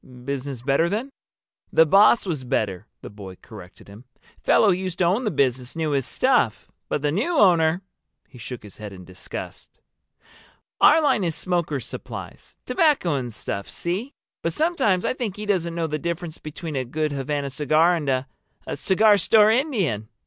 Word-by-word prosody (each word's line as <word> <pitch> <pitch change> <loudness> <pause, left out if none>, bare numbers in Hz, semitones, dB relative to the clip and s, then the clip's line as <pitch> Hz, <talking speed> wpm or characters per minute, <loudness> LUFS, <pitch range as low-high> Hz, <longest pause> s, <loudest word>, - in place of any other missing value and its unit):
"Business 135 -2 -4
better 140 +5 +2
then?" 230 +8 -3 0.6
"The 160 - +6
boss 200 +8 +5
was 155 -8 -3
better," 110 -6 -2 0.2
the - - -7
boy 100 -3 -10
corrected 100 -6 -13
him. 105 +5 -14 0.4
"Fellow 215 - +4
who - - +5
used 185 -1 -4
to - - +1
own 195 +9 +1
the - - +2
business 130 - 0
knew 160 -2 -1
his 135 -2 0
stuff. 250 - +1 0.2
But 145 - -2
the 145 - +1
new 270 - 0
owner—!" 175 -3 +4 0.4
He 125 - -15
shook 120 +1 -8
his 105 - -13
head 105 -2 -8
in 90 -1 -11
disgust. 90 +1 -8 1.1
"Our 315 +1 +6
line 235 -8 +2
is 165 -3 -1
smokers' 170 -8 -2
supplies—tobacco 295 - -2
and 125 -4 -3
stuff, 100 -2 -5
see? 200 - -3 0.3
But 165 - -2
sometimes 265 - +1
I - - +1
think 235 -7 -4
he 210 - -6
doesn't 175 -5 -1
know 170 -1 -1
the 155 -1 -3
difference 170 0 -4
between 155 0 -7
a 130 - 0
good 155 +5 -2
Havana 140 0 -3
cigar 155 +5 +3
and 150 -4 -3
a—a 130 0 -5
cigar 205 +2 +4
store 215 +1 +5
Indian." 205 - 0
160 Hz, 170 wpm, -23 LUFS, 130-195 Hz, 1.1 s, The